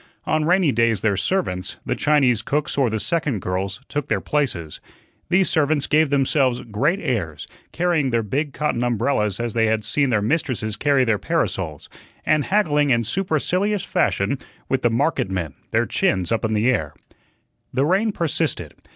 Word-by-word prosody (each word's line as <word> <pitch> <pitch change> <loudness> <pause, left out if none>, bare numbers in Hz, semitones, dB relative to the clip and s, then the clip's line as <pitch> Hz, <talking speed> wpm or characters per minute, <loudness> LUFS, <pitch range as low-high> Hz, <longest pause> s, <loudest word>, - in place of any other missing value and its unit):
On 155 -1 +1
rainy 180 -2 +3
days 115 -3 +2
their 105 -3 +2
servants 95 - -2
the - - 0
Chinese 135 -7 +3
cooks 145 +6 -1
or 135 -4 +2
the 110 0 -2
second 150 -5 -1
girls 95 +3 -3
took 145 -2 -3
their 105 - 0
places. 95 - -2 0.5
These 185 +2 +3
servants 150 -2 +1
gave 155 0 +3
themselves 135 -2 +2
great 135 - 0
airs, 80 - -3 0.3
carrying 170 -5 +1
their 115 -2 +1
big 140 +8 -2
cotton 145 -5 -1
umbrellas 115 -4 0
as 120 -2 -2
they 115 -1 +2
had 110 0 0
seen 140 -2 +1
their 110 -4 +1
mistresses 115 -5 -1
carry 140 +3 +2
their 110 -4 +1
parasols, 95 - -2 0.4
and 155 -2 +2
haggling 150 -8 +2
in 120 -2 +3
supercilious 185 - 0
fashion 140 - 0 0.3
with 135 -1 +1
the 120 - +3
market 130 -2 0
men, 85 -7 -3 0.2
their - - +1
chins 95 +1 0
in 110 -1 0
the 110 +5 +3
air. 75 - -2 0.8
The 135 +2 +1
rain 195 +7 +2
persisted. 165 -7 -2
130 Hz, 165 wpm, -22 LUFS, 110-150 Hz, 0.8 s, rainy